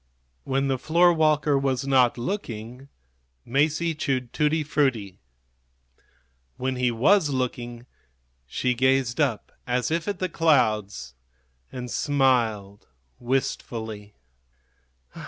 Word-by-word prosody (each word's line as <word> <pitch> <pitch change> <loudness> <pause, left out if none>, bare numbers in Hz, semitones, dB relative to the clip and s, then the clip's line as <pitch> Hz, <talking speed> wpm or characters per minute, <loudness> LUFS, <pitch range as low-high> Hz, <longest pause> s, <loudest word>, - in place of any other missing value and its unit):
When 135 +1 0
the 135 -1 -1
floorwalker 155 -3 +3
was 135 -1 -1
not 130 -3 +3
looking 125 - -5 0.6
Masie 155 +5 +1
chewed 130 -5 -2
tutti 155 +1 +1
frutti; 130 - -1 1.4
when 130 +1 -2
he 125 0 +2
was 150 - +3
looking 120 -2 -3 0.6
she 125 - 0
gazed 130 0 +1
up 120 -8 -1 0.2
as 125 +3 0
if 165 0 -1
at 205 -2 -2
the 185 - -1
clouds 110 - +1 0.6
and 125 -2 -6
smiled 115 -8 0 0.3
wistfully. 110 -4 -3
130 Hz, 100 wpm, -25 LUFS, 120-150 Hz, 1.4 s, floorwalker